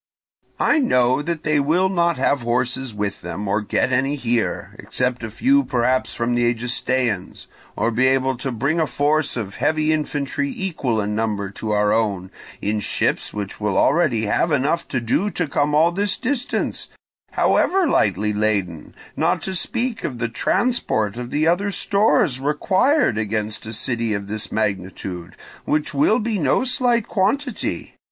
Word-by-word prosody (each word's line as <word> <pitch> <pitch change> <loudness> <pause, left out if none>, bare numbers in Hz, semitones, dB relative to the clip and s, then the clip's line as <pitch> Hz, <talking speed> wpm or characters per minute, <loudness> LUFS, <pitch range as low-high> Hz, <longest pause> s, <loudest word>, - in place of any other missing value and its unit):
I 315 - +3
know 130 - +3
that 165 +1 -3
they 155 -1 +2
will 165 +7 +2
not 170 -3 +1
have 135 +1 +1
horses 125 +2 -1
with 105 -1 -4
them, 105 0 -5
or 105 +2 +1
get 105 +4 0
any 135 +3 +1
here, 120 -4 -1
except 125 -1 -2
a 110 - -4
few 270 - +3
perhaps 130 - 0
from 120 +1 0
the 120 0 +3
Egestaeans; 120 -3 -2 0.3
or 115 - 0
be 130 +3 +2
able 130 0 +2
to 130 +2 -3
bring 140 +8 0
a 160 - +2
force 145 0 0
of 100 -4 -5
heavy 155 0 +1
infantry 145 -2 -2
equal 145 - -1
in 105 0 -1
number 105 -3 -2
to 110 +2 -6
our 105 0 +2
own, 100 -5 -1 0.3
in 105 +1 0
ships 105 - -1
which 105 0 -6
will 105 -2 0
already 140 -7 +3
have 155 +10 +1
enough 145 +4 +1
to 130 - -1
do 120 - 0
to 180 -5 -2
come 145 +1 +1
all 165 +3 +4
this 200 +3 -1
distance, 255 0 -2 0.5
however 380 0 +3
lightly 105 - +1
laden, 100 -6 -1 0.2
not - - +1
to 190 - -3
speak 235 +5 -2
of 125 - -3
the 115 0 -2
transport 115 - 0
of 120 0 -6
the 150 +4 0
other 175 +5 +2
stores 200 - +2
required 185 - +2
against 110 0 -2
a - - -5
city 115 -1 -1
of 100 0 -4
this 105 +1 -5
magnitude, 95 -4 -3 0.3
which 150 0 0
will 145 +11 +3
be 220 -3 -1
no 145 - +2
slight 245 -3 +1
quantity. 250 +5 -1
130 Hz, 165 wpm, -21 LUFS, 110-170 Hz, 0.5 s, all